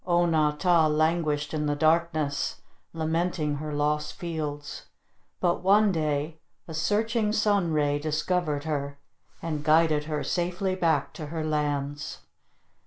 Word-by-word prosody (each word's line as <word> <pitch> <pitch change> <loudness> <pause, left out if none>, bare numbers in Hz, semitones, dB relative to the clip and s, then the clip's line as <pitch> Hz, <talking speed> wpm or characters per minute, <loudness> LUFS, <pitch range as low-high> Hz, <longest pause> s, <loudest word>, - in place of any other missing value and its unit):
O 175 0 +3
na 155 -3 +3
tah 165 +1 +3
languished 155 -1 +1
in 150 -1 -1
the 145 - +1
darkness, 155 -2 +1 0.3
lamenting 160 -2 -1
her 155 +1 -5
lost 150 +1 0
fields. 150 -4 -5 0.5
But 175 -1 +1
one 200 +3 +4
day 155 -1 -1 0.3
a 165 - -7
searching 210 +6 +1
sun 205 -5 +2
ray 145 -1 +1
discovered 155 0 -1
her, 140 -2 -3 0.5
and 155 -3 -3
guided 155 -1 +3
her 150 -2 -2
safely 180 +2 -1
back 165 -6 +1
to 155 - -7
her 160 +1 -4
lands. 145 -1 -2
155 Hz, 130 wpm, -27 LUFS, 150-175 Hz, 0.5 s, one